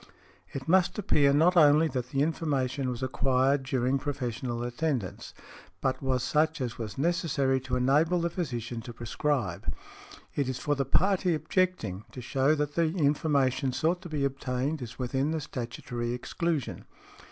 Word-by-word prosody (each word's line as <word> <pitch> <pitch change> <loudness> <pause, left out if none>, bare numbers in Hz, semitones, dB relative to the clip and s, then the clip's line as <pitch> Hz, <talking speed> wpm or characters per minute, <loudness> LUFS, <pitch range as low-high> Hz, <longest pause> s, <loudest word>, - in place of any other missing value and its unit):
It 135 -1 -6
must 185 +4 +3
appear 150 -8 +3
not 165 +6 +4
only 155 -1 +6
that 125 -2 -3
the 135 0 +1
information 140 -4 -1
was 125 +1 -4
acquired 130 +1 +2
during 130 0 0
professional 125 -3 -3
attendance, 120 - -2 0.5
but 130 - -1
was 130 -2 0
such 155 +3 +1
as 120 -4 -4
was 110 -4 -5
necessary 140 -4 +1
to 130 -1 -2
enable 150 +8 +3
the 170 0 -1
physician 120 - -3
to 120 +1 -8
prescribe. 115 - -2 0.6
It 140 -3 -1
is 130 - -2
for 145 - 0
the 140 -1 0
party 185 +4 +2
objecting 155 - -1
to - - -7
shew 135 +4 +2
that 145 -1 -2
the 165 -1 +2
information 140 -4 +2
sought 170 +6 0
to 175 - -9
be 145 -3 0
obtained 135 +2 -2
is 120 -3 -7
within 130 +3 -1
the 160 0 -1
statutory 120 -2 -4
exclusion. 155 +3 -2
135 Hz, 155 wpm, -29 LUFS, 125-155 Hz, 0.6 s, only